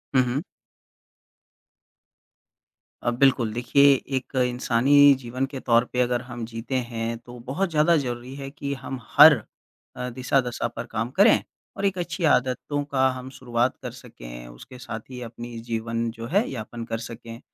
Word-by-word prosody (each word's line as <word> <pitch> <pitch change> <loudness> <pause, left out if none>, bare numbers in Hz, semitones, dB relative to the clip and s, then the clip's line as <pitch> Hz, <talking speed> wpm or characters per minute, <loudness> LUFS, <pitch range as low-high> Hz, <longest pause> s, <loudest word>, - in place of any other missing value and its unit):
हुँ, 130 - +6
हुँ। 125 +3 -1 2.6
अ, - - +1
बिल्कुल 120 -3 +2
देखिए 140 +4 +5 0.2
एक 130 +1 -4
इंसानी 130 +3 +5
जीवन 130 +1 -3
के 135 - -5
तौर 120 -1 +3
पे 125 - -1
अगर 125 0 +1
हम 120 -2 -7
जीते 115 +3 -5
हैं 115 0 -3
तो 120 +1 -12
बहुत 180 +9 -1
ज़्यादा 155 +2 +4
ज़रूरी 125 -2 -4
है 135 -1 -6
कि 140 0 -4
हम 130 - -5 0.2
हर 150 +2 +11 0.6
अ, 125 - -4
दिशा-दशा 125 -1 0
पर 115 0 -7
काम 115 +1 -3
करें, 200 - +5 0.3
और 200 - -1
एक 195 -2 +1
अच्छी 175 +1 -4
आदतों 130 +3 0
का 130 -1 +3
हम 130 0 -7
शुरुआत 125 -1 -1
कर - - -5
सकें, - - -11
उसके - - -12
साथ 115 -2 -6
ही 125 -1 -8
अपनी 120 0 -8
जीवन 115 0 -2
जो 115 0 -8
है 200 +6 +2
यापन 115 -1 -6
कर 115 0 -3
सकें। 115 0 -9
125 Hz, 160 wpm, -25 LUFS, 115-135 Hz, 2.6 s, हर